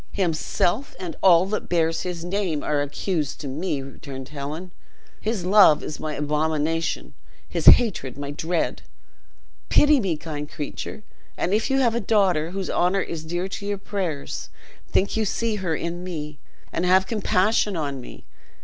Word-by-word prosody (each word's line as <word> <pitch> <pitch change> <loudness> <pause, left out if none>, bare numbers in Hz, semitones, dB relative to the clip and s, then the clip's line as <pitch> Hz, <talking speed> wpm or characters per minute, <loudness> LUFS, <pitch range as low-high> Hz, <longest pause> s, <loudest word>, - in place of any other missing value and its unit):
"Himself, 180 - 0
and 175 -3 -5
all 180 -1 +6
that 210 +2 -3
bear 165 -2 +3
his 170 0 -4
name, 180 -5 -1
are 150 -1 +1
accused 145 +1 -2
to 145 - -5
me," 145 0 -2
returned 135 -1 -9
Helen; 150 +5 -6 0.5
"his 215 -5 -2
love 190 -6 +6
is 155 - -5
my 155 -1 -3
abomination, 155 +2 -1 0.3
his - - -3
hatred 175 - +6
my 140 0 -4
dread. 160 +3 -1 0.9
Pity 295 -1 +5
me, 185 -8 0
kind 150 -2 -6
creature; 155 +7 -6 0.3
and 185 - 0
if 220 +5 +1
you 270 0 +3
have 235 -3 +3
a 235 - 0
daughter 190 -7 +2
whose 190 +1 -4
honor 185 +3 +2
is 160 -2 -5
dear 175 +3 -2
to 200 - -6
your 205 0 -1
prayers, 185 -8 -4 0.4
think 195 - +1
you 220 - +1
see 220 +1 -1
her 180 -5 -1
in 170 +3 -4
me, 150 -5 -6 0.3
and 165 - -1
have 185 +1 +4
compassion 205 -1 +1
on 140 -4 -3
me. - - -12
175 Hz, 160 wpm, -24 LUFS, 150-195 Hz, 0.9 s, all